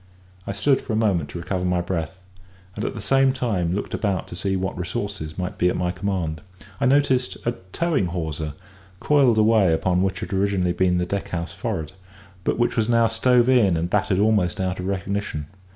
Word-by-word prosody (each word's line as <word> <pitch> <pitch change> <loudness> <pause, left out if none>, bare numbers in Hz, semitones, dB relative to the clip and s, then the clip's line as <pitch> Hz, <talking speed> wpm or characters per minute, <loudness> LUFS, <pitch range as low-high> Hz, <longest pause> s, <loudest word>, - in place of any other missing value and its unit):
I - - -1
stood 130 +7 +2
for 115 - -4
a - - +1
moment 95 -9 +1
to - - -7
recover 90 +2 -3
my 90 -1 +1
breath; 90 +1 -4 0.5
and 105 - -4
at - - -3
the 110 - -5
same 135 +5 +3
time 95 -9 -1
looked 105 - -4
about 100 -4 -1
to - - -7
see 95 +2 -1
what 95 +1 -2
resources 90 -2 -4
might 90 -1 -4
be 90 - +4
at - - -1
my 90 -1 0
command. 90 -4 -3 0.4
I 135 - +2
noticed 130 -2 +2
a 120 - +2 0.2
towing 165 - +1
hawser 80 -3 -4 0.4
coiled 135 -6 +4
away 110 -4 +4
upon 90 +2 +1
what 95 -1 0
had - - -5
originally 95 -2 +1
been 90 0 +2
the 90 - 0
deckhouse 90 -3 -3
forward, 80 -2 -3 0.5
but - - 0
which 120 0 +1
was 115 -1 +1
now 115 -1 +4
stove 120 +2 +3
in 110 -10 +4
and 85 +2 -2
battered 95 -2 +1
almost 100 -4 +2
out 95 -1 -1
of 90 - -3
recognition. 100 -5 -3
95 Hz, 200 wpm, -23 LUFS, 90-110 Hz, 0.5 s, be